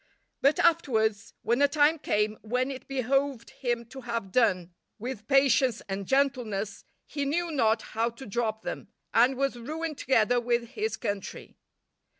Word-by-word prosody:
But, 280 Hz, +3 st, +4 dB
afterwards, 225 Hz, -10 st, +1 dB
when 235 Hz, +4 st, +1 dB
a 285 Hz, -, +6 dB
time 300 Hz, +2 st, +3 dB
came 210 Hz, -4 st, 0 dB
when 250 Hz, +4 st, -1 dB
it 265 Hz, -, -8 dB
behoved 270 Hz, -1 st, -1 dB
him 240 Hz, -2 st, -2 dB
to 265 Hz, +1 st, -9 dB
have 230 Hz, -6 st, -4 dB
done 185 Hz, -7 st, +2 dB, 0.2 s
with 225 Hz, -2 st, -6 dB
patience 270 Hz, -3 st, +3 dB
and 195 Hz, -1 st, -4 dB
gentleness, 245 Hz, -8 st, 0 dB, 0.2 s
he 285 Hz, -1 st, -3 dB
knew 335 Hz, +5 st, -1 dB
not 225 Hz, -6 st, +2 dB
how 230 Hz, +2 st, +1 dB
to 235 Hz, +3 st, -11 dB
drop 220 Hz, 0 st, -2 dB
them, -, -, -5 dB, 0.3 s
and 245 Hz, +3 st, +4 dB
was 275 Hz, -2 st, -1 dB
ruined 310 Hz, +4 st, -4 dB
together 245 Hz, -1 st, +3 dB
with 235 Hz, -1 st, 0 dB
his 435 Hz, -, -3 dB
country. 200 Hz, -1 st, -5 dB
245 Hz, 155 wpm, -28 LUFS, 220-275 Hz, 0.3 s, a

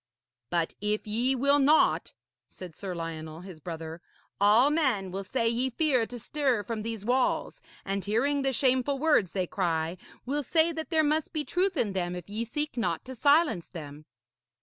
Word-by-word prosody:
'But 170 Hz, -2 st, 0 dB
if 210 Hz, +1 st, -1 dB
ye 235 Hz, +5 st, +1 dB
will 280 Hz, +3 st, +3 dB
not,' 295 Hz, +3 st, +3 dB, 0.3 s
said 180 Hz, -4 st, -10 dB
Sir 190 Hz, -3 st, -5 dB
Lionel, 160 Hz, -1 st, -6 dB
his 180 Hz, -3 st, -10 dB
brother, 165 Hz, 0 st, -7 dB, 0.4 s
'all 215 Hz, +8 st, +5 dB
men 255 Hz, -, +1 dB
will 195 Hz, +2 st, -4 dB
say 230 Hz, +3 st, -1 dB
ye 240 Hz, +3 st, +1 dB
fear 255 Hz, -3 st, +1 dB
to 245 Hz, -, -7 dB
stir 260 Hz, -3 st, 0 dB
from 220 Hz, +2 st, -4 dB
these 220 Hz, -2 st, -5 dB
walls, 255 Hz, -, 0 dB, 0.2 s
and 195 Hz, 0 st, -2 dB
hearing 275 Hz, +8 st, +1 dB
the 270 Hz, 0 st, +1 dB
shameful 260 Hz, +1 st, +2 dB
words 275 Hz, -, +2 dB
they 185 Hz, -2 st, 0 dB
cry, 170 Hz, -2 st, -1 dB, 0.3 s
will 285 Hz, +4 st, 0 dB
say 320 Hz, +5 st, +2 dB
that 320 Hz, -1 st, -5 dB
there 320 Hz, -2 st, +3 dB
must 305 Hz, +1 st, 0 dB
be 305 Hz, -2 st, -2 dB
truth 365 Hz, 0 st, 0 dB
in 210 Hz, -6 st, 0 dB
them 180 Hz, -1 st, -2 dB
if 180 Hz, -2 st, -8 dB
ye 215 Hz, +3 st, -3 dB
seek 295 Hz, +3 st, -3 dB
not 175 Hz, -8 st, -1 dB
to 260 Hz, -, -7 dB
silence 285 Hz, -, +3 dB
them.' 150 Hz, -3 st, -9 dB
230 Hz, 180 wpm, -28 LUFS, 185-280 Hz, 0.4 s, all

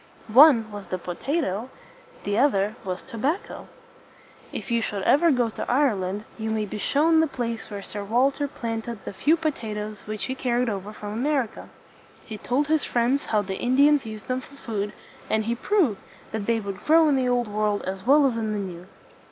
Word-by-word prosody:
One 250 Hz, -5 st, +7 dB
was 205 Hz, -1 st, -8 dB
the 185 Hz, -, -2 dB
po 175 Hz, 0 st, -5 dB
ta 275 Hz, +10 st, -4 dB
to, 220 Hz, 0 st, -3 dB, 0.5 s
the 205 Hz, -, -1 dB
other 215 Hz, -5 st, +2 dB
was 185 Hz, -1 st, -4 dB
to 230 Hz, -, -9 dB
bac 310 Hz, -, 0 dB
co. -, -, -10 dB, 0.8 s
If -, -, -6 dB
you 235 Hz, 0 st, +2 dB
should 205 Hz, -3 st, -3 dB
ever 335 Hz, -, +5 dB
go 250 Hz, -5 st, +3 dB
to 220 Hz, -, -4 dB
Ireland, 210 Hz, -7 st, +1 dB
you 220 Hz, 0 st, -2 dB
may 220 Hz, -1 st, 0 dB
be 210 Hz, +1 st, -6 dB
shown 320 Hz, +8 st, +3 dB
the 320 Hz, -, +3 dB
place 235 Hz, -5 st, -4 dB
where 200 Hz, -2 st, -6 dB
Sir 205 Hz, 0 st, -6 dB
Walter 265 Hz, +7 st, +1 dB
planted 230 Hz, -3 st, -5 dB
the -, -, -5 dB
few 305 Hz, -, +3 dB
po 315 Hz, -1 st, 0 dB
ta 220 Hz, -6 st, -6 dB
toes 210 Hz, -1 st, -6 dB
which 215 Hz, -1 st, -3 dB
he 260 Hz, -, -2 dB
carried 250 Hz, -2 st, 0 dB
over 200 Hz, 0 st, -4 dB
from 210 Hz, -1 st, -7 dB
America. 260 Hz, 0 st, -1 dB, 0.6 s
He 215 Hz, -2 st, -7 dB
told 270 Hz, +4 st, 0 dB
his 310 Hz, +1 st, +1 dB
friends 245 Hz, +4 st, +1 dB
how 210 Hz, -2 st, +1 dB
the 190 Hz, -1 st, -5 dB
Indians 280 Hz, +1 st, +4 dB
used 215 Hz, -2 st, -8 dB
them 255 Hz, 0 st, -1 dB
for 275 Hz, -, -15 dB
food; 210 Hz, -6 st, -3 dB, 0.4 s
and 220 Hz, 0 st, +1 dB
he 230 Hz, -, 0 dB
proved 285 Hz, -, +1 dB, 0.3 s
that 215 Hz, -2 st, -4 dB
they 230 Hz, -1 st, +2 dB
would 200 Hz, -2 st, -6 dB
grow 320 Hz, +1 st, +5 dB
in 290 Hz, -, +3 dB
the 255 Hz, -1 st, +1 dB
Old 245 Hz, -1 st, +1 dB
World 210 Hz, 0 st, 0 dB
as 190 Hz, 0 st, -5 dB
well 285 Hz, +4 st, +5 dB
as 255 Hz, -4 st, +1 dB
in 220 Hz, -1 st, -1 dB
the -, -, -2 dB
New. 180 Hz, -3 st, -6 dB
230 Hz, 210 wpm, -25 LUFS, 210-275 Hz, 0.8 s, One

